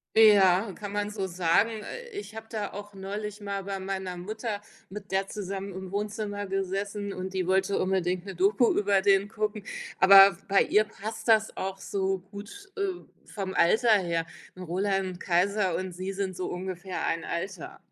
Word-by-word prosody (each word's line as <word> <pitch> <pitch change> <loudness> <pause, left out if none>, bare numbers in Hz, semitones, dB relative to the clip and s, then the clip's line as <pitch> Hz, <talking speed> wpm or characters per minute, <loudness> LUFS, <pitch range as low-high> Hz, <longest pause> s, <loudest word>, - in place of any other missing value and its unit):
Ja, 200 -2 +6
kann 205 +2 -7
man 205 0 -2
so 200 -3 -3
sagen. 175 +4 +2
Äh, 230 - -7
ich 225 - -7
habe 220 0 -8
da 210 -3 -3
auch 205 0 -9
neulich 205 +2 -5
mal 200 -1 -3
bei 195 -1 -3
meiner 190 -1 -4
Mutter 215 +3 -4 0.3
mit 200 0 -9
der 195 0 +1
zusammen 195 -1 -5
im 190 0 -7
Wohnzimmer 205 0 -3
gesessen 195 +1 -2
und 185 +1 -5
die 185 - 0
wollte 190 +2 +2
unbedingt 185 -1 0
'ne 195 - -6
Doku 200 +6 +3
über 200 -1 +3
den 200 0 +4
gucken. 215 -1 -3 0.4
Aber 195 0 +9
bei 195 0 +4
ihr 215 +1 +3
passt 220 +4 -7
das 220 -1 +4
auch 190 0 -3
so 195 0 -1
gut, 225 - -10
äh, 400 0 0 0.4
vom 195 -2 -4
Alter 220 +7 +4
her, 170 -3 -1 0.3
ne, 185 - -8
Roland 190 +1 -1
Kaiser 185 +1 +1
und 185 0 -3
sie 185 +2 -4
sind 195 -1 -3
so 180 +1 -3
ungefähr 185 0 -4
ein 165 0 -1
Alter. 180 +1 -5
195 Hz, 175 wpm, -28 LUFS, 185-205 Hz, 0.4 s, Aber